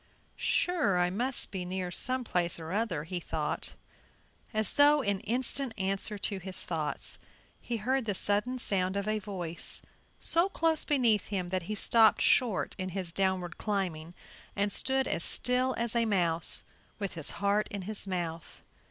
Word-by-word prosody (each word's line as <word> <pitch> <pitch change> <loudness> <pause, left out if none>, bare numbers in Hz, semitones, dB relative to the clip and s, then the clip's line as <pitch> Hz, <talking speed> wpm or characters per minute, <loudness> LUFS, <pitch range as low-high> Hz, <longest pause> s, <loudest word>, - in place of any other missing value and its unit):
"Sure, 325 - 0
I 180 0 +1
must 245 +7 -2
be 190 -2 -4
near 180 0 -4
some 255 +7 0
place 175 -6 0
or 160 +1 -7
other," 200 -7 -1
he 175 +2 -4
thought. - - -4 0.8
As 215 -2 +1
though 290 0 +5
in 200 -2 0
instant 250 +2 +1
answer 195 +2 -2
to 200 0 -2
his 190 0 -8
thoughts, 160 -3 -3 0.4
he 235 - -4
heard 255 +4 -1
the 205 -3 -1
sudden 210 +7 +6
sound 190 -5 -1
of 200 +1 -3
a 215 0 0
voice 180 -5 -1 0.4
so 340 +3 +4
close 325 -4 +1
beneath 235 -8 +2
him 185 -4 -3
that 185 0 -1
he 215 - -2
stopped 220 +1 +4
short 230 -7 +2
in 185 0 -3
his 185 -2 -3
downward 185 -2 -1
climbing 180 -5 -3 0.4
and 205 0 0
stood 265 +3 +1
as 165 - +1
still 255 +1 +5
as 235 0 -2
a 235 -1 +2
mouse, 170 -6 0 0.3
with 200 -2 -4
his 160 -4 +1
heart 205 +1 +1
in 200 -2 -6
his 205 +1 -2
mouth. 170 -3 -5
200 Hz, 165 wpm, -29 LUFS, 180-235 Hz, 0.8 s, sudden